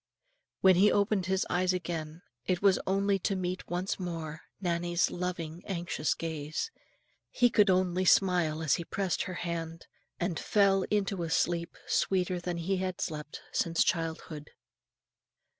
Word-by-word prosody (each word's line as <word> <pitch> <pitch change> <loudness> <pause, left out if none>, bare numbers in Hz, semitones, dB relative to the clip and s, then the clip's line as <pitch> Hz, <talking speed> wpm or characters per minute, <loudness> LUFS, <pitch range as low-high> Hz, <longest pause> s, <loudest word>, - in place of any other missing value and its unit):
When 190 -2 +6
he 205 +3 +6
opened 200 -2 +1
his 190 0 +1
eyes 185 +1 +1
again, 165 -1 -4 0.2
it 185 -2 +1
was 195 -2 +5
only 195 +1 +2
to 195 +2 0
meet 185 0 -3
once 180 +3 -2
more 165 -3 -5 0.2
Nannie's 175 -1 0
loving 175 -2 -4
anxious 170 -5 -1
gaze; 160 - -4 0.6
he 245 -1 +3
could 210 -3 +5
only 185 0 +2
smile 175 -5 +3
as 155 - +3
he 170 - -4
pressed 190 +2 -1
her 185 - -5
hand, 165 -1 -4 0.3
and 175 -3 -1
fell 195 -2 +3
into 200 -3 0
a 165 - -2
sleep, 170 +1 0
sweeter 185 -1 +1
than 175 0 -3
he 185 +3 -1
had 185 -1 -3
slept 150 -2 -5
since 165 -1 +2
childhood. 160 -2 -3
180 Hz, 145 wpm, -30 LUFS, 165-190 Hz, 0.6 s, When